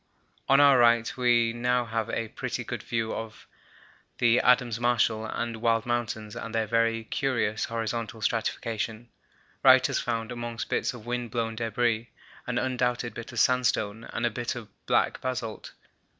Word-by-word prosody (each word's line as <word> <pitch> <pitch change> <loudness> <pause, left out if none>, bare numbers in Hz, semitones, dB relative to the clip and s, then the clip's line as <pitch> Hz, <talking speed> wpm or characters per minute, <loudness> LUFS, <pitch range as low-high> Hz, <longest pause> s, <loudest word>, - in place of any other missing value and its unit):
On 135 +1 +6
our 140 -3 +7
right 115 -1 +4
we 120 -2 +3
have 115 - -5
now 125 0 +1 0.2
a 115 - -2
pretty - - -4
good - - -5
view 115 -1 -2
of 110 -1 -7 0.7
the 120 +1 +4
Adams 125 -2 +3
Marshall 115 -2 +1
and 115 +1 -3
Wild 115 -1 +2
Mountains 115 -3 -2
and 115 -1 -6
their 110 -1 +1
very 115 +1 +1
curious 115 -3 -1
horizontal 115 0 -3
stratification. 115 0 -2 0.5
Wright - - +7
has - - 0
found, 115 -1 -2
amongst 120 -1 -5
bits - - 0
of 115 -2 -11
wind 120 0 -3
blown 115 -2 -2
debris, 115 0 0 0.4
an 125 -1 -1
undoubted 125 -1 -1
bit 120 - -8
of - - -3
sandstone 115 -3 +1
and 120 - -3
a 120 - +1
bit 120 +3 -3
of 115 -3 -8 0.2
black - - +1
basalt. 125 -4 -4
115 Hz, 160 wpm, -27 LUFS, 115-120 Hz, 0.7 s, our